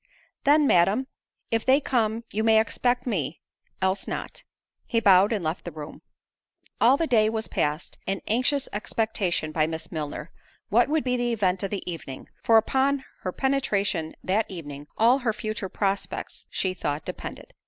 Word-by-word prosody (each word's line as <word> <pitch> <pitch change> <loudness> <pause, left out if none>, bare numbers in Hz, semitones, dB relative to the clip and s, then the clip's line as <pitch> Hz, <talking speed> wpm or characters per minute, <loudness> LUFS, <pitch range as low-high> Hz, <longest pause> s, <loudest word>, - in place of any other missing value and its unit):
"Then, 295 +1 +5
Madam, 195 +4 +4 0.5
if 225 -1 +1
they 265 +2 +5
come, 230 -5 0
you 215 +2 -1
may 220 -1 +6
expect 245 +2 0
me—else 190 - -3
not." - - -5 0.4
He 230 - +2
bowed 200 -1 +6
and 210 -5 -1
left 160 +3 -2
the 175 - -6
room. 150 0 -9 0.8
All 255 +4 +6
the 330 - +1
day 220 -7 +4
was 220 0 -2
passed 150 +2 -2
in 195 0 -1
anxious 255 +5 +1
expectation 205 -6 -1
by 155 0 +2
Miss 160 0 -5
Milner, 150 0 -5 0.4
what 240 +5 +4
would 310 0 +1
be 250 -1 0
the 240 -1 0
event 190 -4 +1
of 195 - -2
the 200 -2 -5
evening: 155 -6 -7
for 225 - +6
upon 265 +4 +2
her 185 - -3
penetration 205 -11 0
that 210 +4 +1
evening 145 -6 -8
all 240 +4 +5
her 240 -4 0
future 215 -3 -4
prospects 200 +1 -3
she 185 -1 -1
thought 145 -4 -3
depended. - - -7
215 Hz, 165 wpm, -26 LUFS, 180-245 Hz, 0.8 s, may